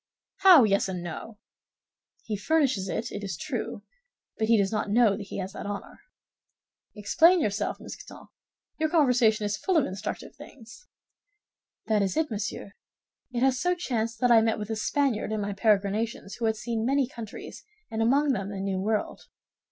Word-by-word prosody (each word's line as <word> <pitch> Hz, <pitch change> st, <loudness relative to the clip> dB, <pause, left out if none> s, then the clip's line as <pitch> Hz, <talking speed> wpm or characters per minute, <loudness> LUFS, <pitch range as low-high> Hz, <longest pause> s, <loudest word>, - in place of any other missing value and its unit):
"How 375 Hz, -8 st, +8 dB
yes 200 Hz, -2 st, +2 dB
and 180 Hz, -2 st, -4 dB
no?" 190 Hz, +6 st, -7 dB, 0.9 s
"He 215 Hz, -, -3 dB
furnishes 255 Hz, -5 st, +1 dB
it, 230 Hz, +5 st, -3 dB
it 205 Hz, -, -6 dB
is 190 Hz, -5 st, -4 dB
true, 235 Hz, -, -4 dB, 0.5 s
but 220 Hz, -, -1 dB
he 230 Hz, 0 st, +5 dB
does 195 Hz, -2 st, +1 dB
not 215 Hz, -1 st, -2 dB
know 225 Hz, 0 st, +4 dB
that 200 Hz, -1 st, -8 dB
he -, -, -6 dB
has 190 Hz, 0 st, -5 dB
that 205 Hz, -, -6 dB
honor." 205 Hz, 0 st, -7 dB, 1.0 s
"Explain 325 Hz, -, +4 dB
yourself, 205 Hz, -7 st, -1 dB
Mousqueton; -, -, -10 dB, 0.5 s
your 315 Hz, 0 st, +1 dB
conversation 245 Hz, -9 st, +3 dB
is 205 Hz, 0 st, -1 dB
full 375 Hz, -, +1 dB
of 300 Hz, -, +3 dB
instructive 190 Hz, +2 st, -6 dB
things." 240 Hz, -, -14 dB, 1.0 s
"That 215 Hz, -2 st, +2 dB
is 195 Hz, +7 st, -1 dB
it, 315 Hz, -4 st, 0 dB
monsieur. 205 Hz, -1 st, -4 dB, 0.6 s
It 240 Hz, -1 st, -2 dB
has 265 Hz, -1 st, +3 dB
so 360 Hz, +4 st, +1 dB
chanced 230 Hz, -9 st, -2 dB
that 245 Hz, -1 st, +4 dB
I 230 Hz, -1 st, +7 dB
met 225 Hz, 0 st, +1 dB
with 210 Hz, +1 st, -5 dB
a -, -, -1 dB
Spaniard 230 Hz, 0 st, 0 dB
in 215 Hz, -, -1 dB
my 205 Hz, 0 st, -2 dB
peregrinations 205 Hz, +1 st, 0 dB
who 235 Hz, -, -2 dB
had 220 Hz, 0 st, +1 dB
seen 225 Hz, 0 st, -3 dB
many 270 Hz, +2 st, +2 dB
countries, 235 Hz, -6 st, -9 dB, 0.3 s
and 220 Hz, 0 st, -2 dB
among 275 Hz, +5 st, +3 dB
them 195 Hz, -3 st, -3 dB
the 200 Hz, -1 st, -6 dB
New 195 Hz, -1 st, -2 dB
World." 215 Hz, +2 st, -2 dB
220 Hz, 175 wpm, -27 LUFS, 205-250 Hz, 1.0 s, How